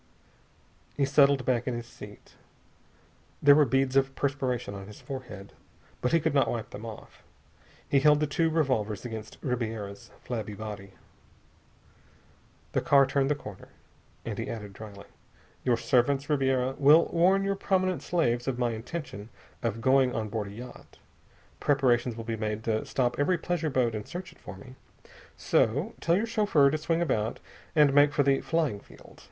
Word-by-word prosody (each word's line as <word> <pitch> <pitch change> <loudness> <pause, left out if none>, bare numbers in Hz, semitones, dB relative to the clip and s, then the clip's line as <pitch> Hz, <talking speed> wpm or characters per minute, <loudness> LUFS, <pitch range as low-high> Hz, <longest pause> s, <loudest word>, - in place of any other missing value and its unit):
He 140 - +2
settled 140 -1 +4
back 125 -1 0
in 125 - -1
his 120 0 -5
seat. - - -13 1.1
There 145 0 +7
were 150 0 +5
beads 135 +1 +1
of 135 0 +2
perspiration 130 -6 -2
on 100 -1 -8
his 105 - -12
forehead, 120 -8 -8 0.5
but 125 - 0
he 165 - +4
could 160 -1 -1
not 135 -4 +3
wipe 115 -2 -4
them 115 +3 -8
off. 110 -2 -11 0.7
He 140 - +3
held 150 +1 +5
the 150 - +1
two 160 +3 0
revolvers 130 - -1
against 110 -2 -7
Ribiera's 110 -6 -4
flabby 110 -4 -5
body. 100 -2 -8 1.8
The - - 0
car 140 -1 +5
turned 135 0 0
the 150 - +2
corner, 105 -9 -10 0.6
and - - -4
he - - -4
added 105 -3 -7
dryly: 100 -1 -11 0.6
"Your 120 -2 +2
servants, 135 +5 +1
Ribiera, 130 -2 +1
will 150 +4 +6
warn 185 +4 +3
your 195 - 0
more - - -7
prominent 185 -1 0
slaves 120 -9 0
of 130 -2 -1
my 120 -1 0
intention 115 -2 -7 0.3
of 115 -1 -2
going 130 0 +3
on 110 -1 -2
board 105 -1 -3
a - - -9
yacht. 120 +4 -11 0.6
Preparations 125 -4 +2
will 115 - -6
be 115 0 -3
made 110 0 -3
to 110 -1 -1
stop 125 -1 -1
every 175 +5 +2
pleasure 165 -1 -2
boat 125 -4 +1
and 105 -1 -5
search 180 +2 -7
it - - -21
for 95 - -10
me. 125 +6 -13 0.6
So... 145 - +1
tell 170 +1 +2
your 215 - 0
chauffeur 205 - +3
to 155 - 0
swing 165 +2 0
about 110 -9 -1 0.4
and 150 -3 +5
make 145 +1 +5
for 145 - +2
the 135 0 +2
flying 155 -11 -1
field. - - -17
130 Hz, 170 wpm, -28 LUFS, 110-145 Hz, 1.8 s, There